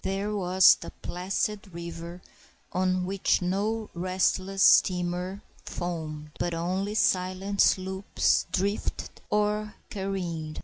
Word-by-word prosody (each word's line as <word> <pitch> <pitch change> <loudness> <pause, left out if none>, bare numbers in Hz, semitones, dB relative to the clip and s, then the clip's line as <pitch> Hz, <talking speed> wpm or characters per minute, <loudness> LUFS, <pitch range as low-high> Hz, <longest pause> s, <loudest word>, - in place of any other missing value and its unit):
There 200 +2 -2
was 185 -1 +6
the - - -6
placid 195 +1 -3
river, 170 +1 -7 0.5
on 185 0 +1
which 195 +1 +1
no 205 +5 -1
restless 185 +2 0
steamer 180 +2 +3 0.2
foamed, 155 -4 -5
but 175 -1 -1
only 185 +5 -2
silent 190 0 +1
sloops 190 +1 +2
drifted 200 +2 -2
or 210 0 0 0.2
careened. 175 -6 -4
185 Hz, 100 wpm, -27 LUFS, 175-195 Hz, 0.5 s, was